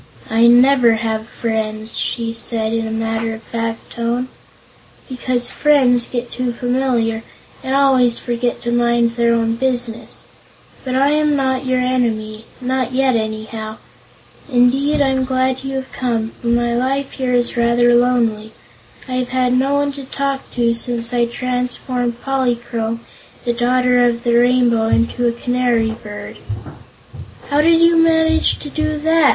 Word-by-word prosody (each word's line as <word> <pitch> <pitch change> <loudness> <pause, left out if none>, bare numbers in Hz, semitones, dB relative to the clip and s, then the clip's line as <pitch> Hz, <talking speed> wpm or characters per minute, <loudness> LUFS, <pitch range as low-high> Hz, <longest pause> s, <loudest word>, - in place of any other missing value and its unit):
"I 230 +1 +5
never 245 0 +5
have 220 0 -2
friends," 220 -1 -3
she 230 -1 -2
said 225 -1 -3
in 225 -1 -1
a - - -5
matter 225 0 -2
of 220 - -13
fact 230 0 -5
tone, 235 +2 -2 0.8
"because 250 -1 -1
friends 255 -5 +3
get 245 -1 -4
too 250 -1 -2
familiar 245 -2 -1 0.4
and 265 +1 -1
always 260 -4 +4
forget 240 0 -2
to 235 - -2
mind 235 -1 +2
their 235 0 +1
own 230 -1 +1
business. 245 -2 -3 0.6
But 255 -1 -3
I 275 +2 +3
am 300 -1 +2
not 260 -1 -1
your 255 0 +1
enemy; 225 -4 -1
not 255 0 -2
yet, 260 -1 +2
anyhow. 220 0 -4 0.7
Indeed, 265 +4 +2
I'm 265 -1 +2
glad 260 0 0
you've 265 -1 -4
come, 230 -3 -1
for 235 - -9
my 235 0 +1
life 270 +3 -1
here 255 -2 -1
is 240 0 0
rather 240 0 +3
lonely. 230 -3 +1 0.5
I've 255 -1 -2
had 255 -1 +1
no 270 +2 +2
one 285 0 +1
to 275 -1 -8
talk 275 0 -3
to 235 -1 +1
since 235 0 -1
I 240 -1 +2
transformed 250 0 -3
Polychrome, 240 -4 -2 0.4
the 240 - +1
Daughter 250 +1 +2
of 235 -1 +1
the 235 - +1
Rainbow, 240 -2 +3
into 235 +2 +1
a - - +2
canary 240 -1 0
bird." 215 -2 -9 1.1
"How 290 +1 +4
did 330 +1 +4
you 335 0 +5
manage 325 0 +3
to - - -5
do 310 0 -1
that?" 320 -1 +3
245 Hz, 150 wpm, -18 LUFS, 230-260 Hz, 1.1 s, I